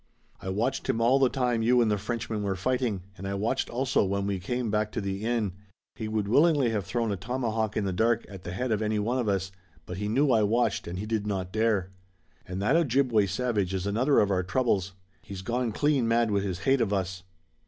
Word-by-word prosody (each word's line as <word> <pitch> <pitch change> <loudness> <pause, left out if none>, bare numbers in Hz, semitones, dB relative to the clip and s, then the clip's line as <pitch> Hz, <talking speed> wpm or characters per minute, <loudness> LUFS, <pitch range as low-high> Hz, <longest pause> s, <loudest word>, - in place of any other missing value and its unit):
"I 95 - -5
watched 110 +8 -1
him 115 - +1
all 120 +4 +4
the 135 -2 +4
time 125 -3 0
you 125 +2 +4
and 115 -3 +3
the 105 - +2
Frenchman 115 0 -3
were 100 -2 -1
fighting, 115 -1 -1
and 95 +2 -7
I 100 - -2
watched 110 +6 -1
also 130 0 +1
when 100 0 -1
we 100 -1 -1
came 120 +4 -2
back 105 0 0
to - - -1
the 100 0 -3
inn. 115 -5 0 0.4
He 110 - -5
would 110 -2 -1
willingly 145 0 +4
have 105 -4 -2
thrown 115 -3 -1
a - - 0
tomahawk 110 +1 -2
in 105 - 0
the 95 - -1
dark 115 +4 +1
at 95 -3 -10
the 90 - -6
head 125 +5 -2
of 110 -1 +1
any 110 0 0
one 115 +5 0
of 115 -4 0
us, 95 -1 -1 0.3
but 90 - -6
he 105 +1 -2
knew 135 +6 +2
I 115 -3 +4
watched 115 +4 +1
and 85 +1 -5
he 100 - -4
did 110 -1 -2
not 95 -3 -3
dare." 110 -4 +1 0.6
"And 90 +1 -4
that 130 +9 +3
Ojibway 130 -9 +3
savage 100 -3 -1
is 95 0 -2
another 120 +8 +2
of 100 -1 +2
our 90 -1 +2
troubles. 95 -1 0 0.3
He's 95 -1 -8
gone 120 +2 -1
clean 140 0 +1
mad 115 -1 +2
with 100 -1 +1
his 95 -2 -3
hate 135 +2 +2
of 110 -3 +1
us." 95 -2 -2
110 Hz, 235 wpm, -27 LUFS, 100-120 Hz, 0.6 s, all